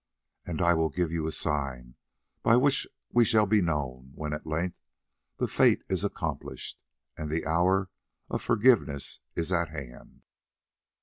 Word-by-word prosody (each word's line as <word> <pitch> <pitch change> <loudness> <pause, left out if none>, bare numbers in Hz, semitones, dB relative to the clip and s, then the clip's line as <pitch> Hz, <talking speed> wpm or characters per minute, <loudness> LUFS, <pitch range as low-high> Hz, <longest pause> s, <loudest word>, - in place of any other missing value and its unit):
And 85 0 -1
I 85 0 +5
will 80 -1 +2
give 80 +3 -1
you 80 -2 -1
a - - -1
sign 70 -6 -2 0.5
by 115 - +5
which 135 +2 +3 0.2
we 120 - +5
shall 110 -2 +4
be 105 0 +3
known 65 -6 -2
when 75 -1 -4
at 75 - -6
length 80 +3 -2 0.6
the - - 0
fate - - +3
is - - 0
accomplished, - - -4 0.4
and 75 -1 -5
the 80 +2 -1
hour 90 +4 +2 0.4
of - - -3
forgiveness 115 - +2 0.2
is 85 +2 -1
at 85 -3 +1
hand. 70 -6 -10
80 Hz, 150 wpm, -28 LUFS, 75-95 Hz, 0.6 s, I